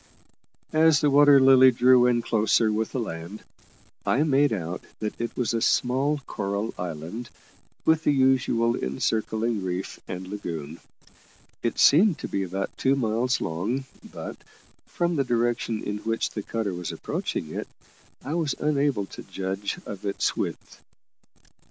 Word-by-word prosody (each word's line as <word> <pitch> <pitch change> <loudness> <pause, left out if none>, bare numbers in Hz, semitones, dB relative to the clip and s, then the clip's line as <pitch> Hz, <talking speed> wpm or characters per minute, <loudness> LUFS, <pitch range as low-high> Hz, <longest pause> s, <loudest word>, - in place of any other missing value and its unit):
As 155 -2 +5
the 145 - +2
Water 145 0 +7
Lily 130 -1 +7
drew 125 0 +5
in 120 -1 +2
closer 110 0 +2
with 110 +1 -1
the 130 - -2
land, 85 -1 -6 0.6
I 140 - +2
made 145 -1 +3
out 90 -4 -3 0.2
that 105 +1 -4
it 115 - -4
was 120 -3 0
a 115 - 0
small 135 +6 +2
coral 100 +1 -3
island, 90 +7 -6 0.6
with 160 0 +3
the - - +3
usual 130 -4 +2
encircling 110 - -1
reef 90 +1 -4
and 90 0 -6
lagoon. 85 -6 -6 0.8
It - - -2
seemed 170 +4 +5
to - - -6
be 100 - -2
about 95 +1 -4
two 135 +1 +3
miles 120 0 0
long, 100 +11 -2 0.3
but, - - -7 0.5
from 175 -1 -1
the 140 - +2
direction 120 -2 -1
in 105 0 -3
which 115 +1 -2
the 105 - -4
cutter 110 -2 -3
was 90 -2 -4
approaching - - -4
it, - - -4 0.6
I 145 - -3
was 160 -4 0
unable 140 -8 +1
to - - -10
judge 95 +1 -4
of 100 -2 -7
its 100 -1 -1
width. - - -5
115 Hz, 150 wpm, -25 LUFS, 100-135 Hz, 0.8 s, Water